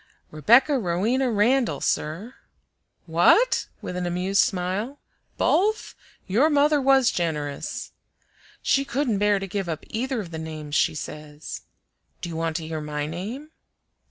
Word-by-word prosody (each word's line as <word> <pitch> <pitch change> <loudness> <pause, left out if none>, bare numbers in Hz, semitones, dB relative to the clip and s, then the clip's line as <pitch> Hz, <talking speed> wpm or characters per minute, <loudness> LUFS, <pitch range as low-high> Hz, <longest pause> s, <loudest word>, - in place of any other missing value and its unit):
"Rebecca 240 - +4
Rowena 220 +8 0
Randall, 235 +3 +2
sir." 180 +11 -2 0.7
"What?" 175 - +4 0.2
with 180 - -5
an 180 -1 -2
amused 185 +3 +2
smile. 195 +8 -1 0.4
"BOTH? 430 +4 +1 0.3
Your 235 +11 +3
mother 295 0 +3
was 270 -2 +4
generous." 150 -5 -3 0.7
"She 275 - +3
couldn't 255 -6 -1
bear 205 0 +3
to 195 - -4
give 195 -1 -3
up 160 -2 -4
either 255 +3 -2
of 180 -5 -6
the 160 - -5
names 155 -2 -7
she 155 - +2
says." 150 0 -7 0.6
"Do 175 - -5
you 165 - -6
want 165 0 -2
to 160 -2 -3
hear 160 -1 -4
my 150 -1 -3
name?" 215 - -6
195 Hz, 140 wpm, -24 LUFS, 160-260 Hz, 0.7 s, Rebecca